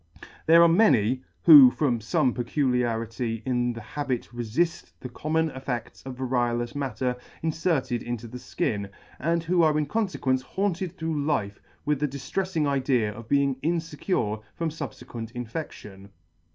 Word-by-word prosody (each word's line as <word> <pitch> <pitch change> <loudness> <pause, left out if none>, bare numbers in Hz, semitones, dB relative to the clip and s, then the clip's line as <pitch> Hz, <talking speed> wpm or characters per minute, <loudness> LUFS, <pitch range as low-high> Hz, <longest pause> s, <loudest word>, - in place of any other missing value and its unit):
There 165 +1 +8
are - - +7
many, 130 - +3 0.2
who 145 -6 +10
from 125 -4 0
fome 130 +3 +1
peculiarity 120 -3 -1
in 120 -1 0
the 115 -1 -7
habit 125 +1 -4
refill; 130 +9 0 0.2
the 125 - -7
common 160 +5 -1
effects 130 -3 -5
of 130 - -6
variolous 120 -2 -1
matter 130 -3 -2 0.3
inferted 155 -7 0
into 120 -1 -5
the 125 +2 -8
Ikin, 100 -4 -2 0.3
and 165 +3 0
who 175 +1 +2
are 155 -2 +3
in 150 - +1
confequence 145 -8 0
haunted 185 +4 -2
through 160 -3 -2
life 110 -10 -1 0.2
with 150 -2 +1
the 150 - +1
dillrefling 150 +5 -2
idea 130 -6 +1
of 115 +2 -11
being 140 -2 +2
infecure 160 - -1 0.2
from 165 -1 -1
fubfequent 130 -6 -7
infection. 110 -6 -7
130 Hz, 140 wpm, -26 LUFS, 120-160 Hz, 0.3 s, who